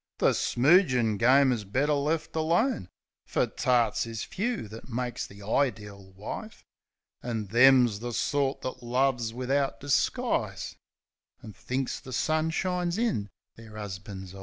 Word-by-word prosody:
The - - +4
smoogin' 125 - +3
game 130 +3 +5
is 115 -4 -1
better 135 +10 0
left 150 +3 -1
alone, 160 - +1 0.4
Fer - - +1
tarts 120 -3 +1
is 115 -1 -5
few 220 - -3
that 110 +5 -11
makes 125 0 -3
ihe 100 +1 -13
ideel 100 -4 -2
wife. 165 - -8 0.6
An' 115 -3 -3
them's 120 0 +5
the 120 +2 -4
sort 140 +3 0
that 130 0 -5
loves 125 -1 0
wivout 135 +3 -1
disguise, 140 0 -1 0.7
An' 110 - -9
thinks 130 +7 -3
the 130 - -10
sun 155 +5 +1
shines 180 +1 -1
in 220 - 0 0.3
their 115 -1 -13
'usbans' 95 -2 -7
eyes. 95 - -10
125 Hz, 135 wpm, -28 LUFS, 110-145 Hz, 0.7 s, game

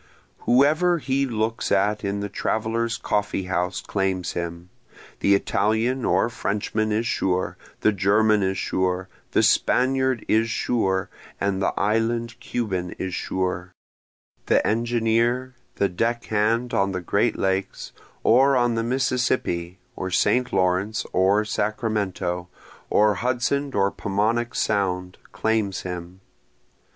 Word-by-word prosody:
Whoever 155 +8 +4
he 140 -2 0
looks 115 -1 -2
at 105 +2 +2
in 100 0 -2
the 100 - -2
traveler's 115 +3 -1
coffee 105 -2 -1
house 90 0 -1
claims 95 -2 -1
him, 85 +1 -5 0.5
The 100 - +4
Italian 110 +6 0
or - - +3
Frenchman 110 -1 -2
is 110 +2 0
sure, 95 -4 0 0.3
the 110 - +4
German 105 +2 +3
is 95 0 0
sure, 95 0 -1 0.2
the - - +4
Spaniard 130 -1 +2
is 115 +1 +2
sure, 95 -5 0 0.3
and 100 -1 0
the - - +2
island 115 +3 0
Cuban 95 -8 -3
is 95 -1 -4
sure, 90 -1 -2 0.7
The - - +3
engineer, 120 +2 +1 0.2
the 100 - +2
deck 115 +6 -1
hand 115 +3 0
on 100 0 +1
the 90 - -3
great 85 - +1
lakes, 95 0 -2 0.3
or 135 +3 +5
on 120 -1 +2
the 115 - 0
Mississippi 125 -8 0 0.2
or 95 - -4
St. 125 +7 +2
Lawrence 95 +3 +1
or 100 +3 +3
Sacramento, 100 -6 -2 0.4
or 105 0 +4
Hudson 130 +6 -1
or 100 0 +2
Paumanok 110 +4 -1
sound, 90 -3 -1
claims 110 -4 0
him. 90 0 -7
105 Hz, 125 wpm, -24 LUFS, 95-120 Hz, 0.7 s, or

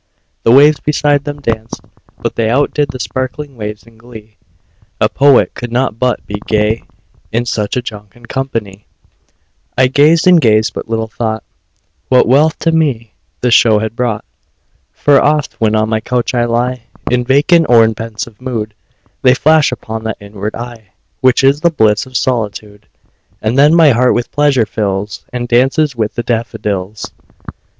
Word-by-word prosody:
The 115 - +3
waves 145 +3 +6
beside 145 -1 0
them 145 0 -6
danced; 115 -3 -3 0.4
but - - -4
they 110 -1 0
Outdid 145 +3 +1
the 130 - -6
sparkling 130 +3 -5
waves 105 -1 -6
in 115 -1 -21
glee; 110 -3 -14 0.6
A - - +3
poet 140 -1 +3
could 120 -1 -7
not 120 -2 -1
but 125 -1 -1
be 105 0 -6
gay, 110 +1 0 0.5
In 120 +2 -1
such 105 -1 -2
a 125 - -2
jocund 110 +1 -10
company; 115 -7 -5 0.9
I 130 - +5
gazed 150 +6 +3
and 180 -2 +6
gazed 110 -3 +2
but - - -7
little 115 0 -2
thought 110 -1 -3 0.7
What 125 -3 +4
wealth 145 +5 +3
to 165 - +2
me 135 -9 -1 0.3
the 125 - +1
show 115 -2 +5
had 110 +1 -3
brought: 120 -4 -2 0.7
For 145 -2 +3
oft, 150 -3 0
when 110 -1 +2
on 110 0 +1
my 110 -1 0
couch 125 +3 -2
I 120 -1 +1
lie 120 +1 -2 0.3
In 125 0 +1
vacant 150 +6 +3
or 115 -2 +6
in 110 - 0
pensive 115 +1 -7
mood, 115 -5 -4 0.5
They 125 -1 +4
flash 155 +1 +3
upon 110 -2 -6
that 110 - -3
inward 100 +1 -6
eye 115 -3 -9 0.3
Which 130 0 +3
is 140 +2 +3
the 170 - +4
bliss 110 -7 +1
of 130 -1 -3
solitude; 105 -4 -3 0.5
And 110 +3 -1
then 145 +4 +5
my 160 -4 +6
heart 125 +1 +2
with 120 - -3
pleasure 145 -5 +2
fills, 100 -1 -3
And 120 -1 -4
dances 135 +4 +2
with 110 -2 -2
the 120 - -2
daffodils. 105 -4 -3
120 Hz, 170 wpm, -14 LUFS, 110-135 Hz, 0.9 s, waves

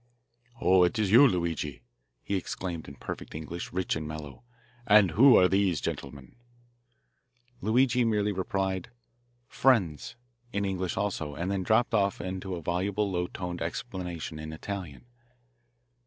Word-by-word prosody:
"Oh, 90 0 +4
it 90 +7 +1
is 105 -3 +1
you, 130 +6 +8
Luigi," 85 - -2 0.4
he 100 - -2
exclaimed 90 -3 -4
in 70 - -10
perfect - - -7
English, 80 +2 -6
rich 95 +1 -1
and 80 -1 -4
mellow. 75 -3 -8 0.5
"And 100 -4 +6
who 125 - +7
are 90 - +6
these 95 -4 +2
gentlemen?" 70 - -6 1.2
Luigi 125 +2 +3
merely 105 -2 +1
replied, 95 0 -2 0.6
"Friends," 100 - +1 0.4
in 100 -2 -1
English 95 -2 -2
also, 80 -8 -2
and 85 +6 -2
then 100 -1 -1
dropped 110 +6 +2
off 100 -2 +2
into 95 0 -4
a 85 - -7
voluble, 100 +4 -1
low 90 -1 -1
toned 90 -2 -6
explanation 85 -3 -5
in 80 0 -6
Italian. 90 - -7
95 Hz, 140 wpm, -28 LUFS, 85-100 Hz, 1.2 s, you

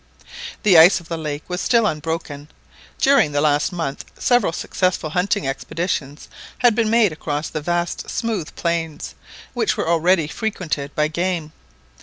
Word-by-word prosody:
The 185 -6 +7
ice 175 +4 +7
of 170 - -16
the 165 - -3
lake 150 -1 -4
was 180 0 -3
still 235 -2 +3
unbroken. 155 -4 -3 0.5
During 265 - +4
the 145 - +1
last 150 0 +2
month 165 -6 -4
several 245 -8 +2
successful 180 -2 -1
hunting 180 -3 0
expeditions 145 +1 -3 0.3
had 245 -2 +4
been 225 -1 +1
made 225 -4 +4
across 150 0 -4
the 155 - -4
vast 175 +2 -2
smooth 215 -9 -3
plains, 165 - -3 0.4
which - - 0
were - - -2
already 170 0 +3
frequented 155 -5 -4
by 150 0 +2
game. 170 -1 -2
165 Hz, 150 wpm, -21 LUFS, 150-185 Hz, 0.5 s, The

